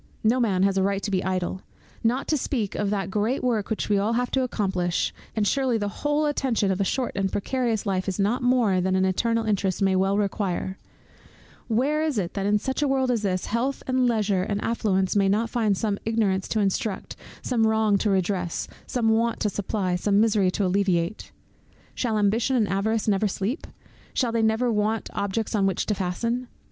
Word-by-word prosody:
No 230 +4 +3
man 195 -6 +2
has 195 0 +2
a - - +2
right 195 +1 0
to 205 - -2
be 185 -1 +1
idle 185 0 -2 0.4
Not 245 +4 +1
to 310 - +3
speak 240 -7 -2
of 205 - -1
that 195 -2 -2
great 215 +7 0
work 230 -5 0
which 220 - -2
we 205 -1 +2
all 210 +3 +1
have 245 +1 0
to 265 - +1
accomplish, 190 -8 -1 0.2
and 215 -2 +1
surely 260 -2 +1
the 205 -1 -2
whole 295 +1 +1
attention 260 -9 +1
of 190 +1 -1
a - - +4
short 250 +5 -1
and 195 -1 -1
precarious 230 0 -1
life 190 -1 -1
is 190 - -2
not 210 +6 +1
more 245 -7 +3
than 185 +1 +1
an 190 0 +3
eternal 230 +4 +1
interest 195 -3 0
may 195 -1 +2
well 195 +1 +2
require; 195 -2 -2 0.9
where 270 +7 +1
is 310 -5 0
it 180 -3 -2
that 195 -1 -2
in 210 +1 +3
such 265 +7 -2
a 295 - +2
world 265 -2 +1
as 235 -3 0
this, 185 -3 -1
health 250 +5 -1
and 255 -1 +2
leisure 210 -5 +1
and 200 +2 -2
affluence 195 -5 0
may 195 -1 +3
not 220 +3 +1
find 215 -5 +1
some 205 -1 -1
ignorance 210 -4 0
to 220 - -1
instruct, 200 0 -1 0.3
some 230 -3 +2
wrong 220 -1 +2
to 215 - +1
redress, 185 -2 -1 0.2
some 235 -3 +1
want 230 +1 +1
to 210 - 0
supply, 190 -2 -1
some 200 +3 +2
misery 210 -4 +3
to 195 +2 -1
alleviate? 185 0 0 0.6
Shall 225 -4 -1
Ambition 225 +6 +2
and 225 -4 +2
Avarice 210 +4 0
never 210 0 +2
sleep? 200 - -3 0.5
Shall 245 -3 +1
they 230 0 +1
never 220 +2 +2
want 215 0 -1
objects 205 +2 -2
on 200 -3 +2
which 190 - -1
to 215 - 0
fasten? 230 +7 -2
210 Hz, 205 wpm, -25 LUFS, 195-235 Hz, 0.9 s, a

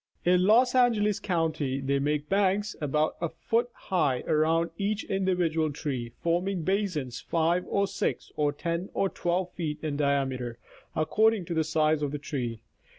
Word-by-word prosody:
In 180 +1 +4
Los 245 +4 +5
Angeles 225 -5 +3
county 155 -7 -1
they 140 +1 0
make 145 +1 -1
banks 200 +2 +1
about 150 +1 0
a 170 - 0
foot 230 +9 -1
high 155 - 0
around 165 +2 +1
each 205 +3 -1
individual 175 -5 0
tree, 130 -5 -4
forming 175 +1 0
basins 175 - -1
5 170 +2 +1
or 200 0 +1
6 200 +1 -3
to 150 -1 +1
10 170 +4 -3
or 195 - +1
12 180 +1 -1
feet 155 -4 -3
in 150 -2 -2
diameter 135 -4 0 0.4
according 210 +5 +2
to 170 - -4
the 160 -1 +2
size 155 -1 +1
of 145 -2 -1
the 150 - -3
tree. 125 -6 -4
165 Hz, 155 wpm, -28 LUFS, 145-190 Hz, 0.4 s, Los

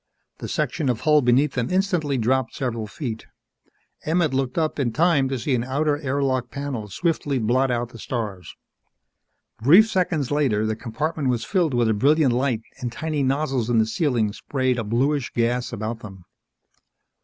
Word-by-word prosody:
The - - -5
section 145 -5 -1
of 120 -3 -1
hull 150 -1 +4
beneath 130 +3 +3
them 125 -2 -1
instantly 180 -7 0
dropped 125 +1 0
several 115 -5 -3
feet. 115 0 -6 0.8
Emmett 160 -2 +1
looked 130 +1 -1
up 155 -2 0
in 125 -4 +1
time 150 -1 +2
to 135 - -2
see 130 +4 -1
an 120 -2 +1
outer 145 +3 0
air 140 -1 -1
lock 130 -2 0
panel 135 -7 -5
swiftly 145 - -1
blot 125 +3 +1
out 120 -1 -1
the 115 - -12
stars. 105 -7 -5 1.1
Brief 175 - +7
seconds 175 - 0
later, 130 -8 +1
the 110 0 -1
compartment 135 +6 -2
was 120 -2 -1
filled 170 -9 +1
with 120 -1 +2
a 110 - +3
brilliant 140 +4 +3
light 125 -3 0 0.2
and 125 -3 -3
tiny 155 +3 -2
nozzles 135 -3 0
in 120 - +2
the 110 - +4
ceiling 115 - 0
sprayed 130 0 -1
a - - -2
bluish 130 +5 0
gas 120 +1 0
about 110 0 -4
them. 95 -5 -11
130 Hz, 175 wpm, -23 LUFS, 115-150 Hz, 1.1 s, Brief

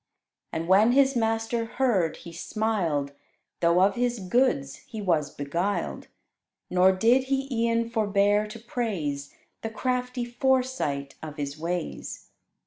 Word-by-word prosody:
And 165 +1 -3
when 205 +6 +5
his 275 0 +4
master 225 0 0
heard, 225 -9 +1
he 170 - -11
smiled, 170 -8 -1 0.5
Though 170 +1 +4
of 195 +2 +4
his 245 0 0
goods 190 - +1
he 220 - -9
was 165 -7 +1
beguiled: 170 +9 -2 0.6
Nor 185 +1 +5
did 230 +7 +3
he 270 0 -1 0.2
e'en 230 0 +1
forbear 205 -2 +2
to 215 +2 -8
praise 185 - -3 0.3
The 225 - -3
crafty 250 +2 -2
foresight 240 - 0
of 155 -1 -8
his 140 -1 -3
ways. 170 +2 -4
210 Hz, 130 wpm, -27 LUFS, 170-240 Hz, 0.6 s, when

